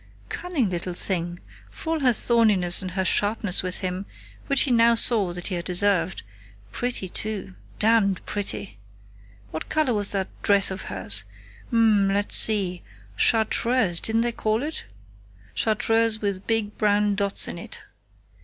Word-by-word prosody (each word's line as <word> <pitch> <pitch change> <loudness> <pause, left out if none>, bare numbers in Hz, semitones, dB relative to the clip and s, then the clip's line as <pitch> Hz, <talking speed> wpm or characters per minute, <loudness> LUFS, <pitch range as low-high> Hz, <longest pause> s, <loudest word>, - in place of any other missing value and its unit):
Cunning 335 - -2
little 175 0 -4
thing, 175 -2 -1 0.3
for 325 - -5
all 320 - -1
her 260 -3 +4
thorniness 210 -7 +2
and 185 - -4
her 190 +1 -2
sharpness 205 -1 +1
with 185 +1 -4
him, 185 +1 -3 0.4
which 275 -1 +3
he 270 - +1
now 235 0 +5
saw 220 -5 +3
that 175 0 -6
he 195 - -3
had 175 0 -3
deserved.... 185 -1 0 0.5
Pretty, 240 - -2
too.... 200 0 -4 0.2
Damned 215 -3 +2
pretty!... 105 - -4 0.7
What 160 - -6
color 310 -5 +1
was 205 -2 +2
that 195 -2 -2
dress 200 -1 +3
of 190 - -5
hers?... 100 +1 +1 0.5
Ummm, 215 -4 +3
let's 205 +1 0
see... 190 -5 +3 0.3
Chartreuse, 220 - +2
didn't 225 +1 0
they 240 0 +1
call 220 +1 -1
it? 310 +2 -5 0.7
Chartreuse 225 0 +1
with 200 -2 -4
big 220 -2 -1
brown 210 -1 +2
dots 200 0 +1
in - - -6
it. - - -9
205 Hz, 150 wpm, -24 LUFS, 185-225 Hz, 0.7 s, now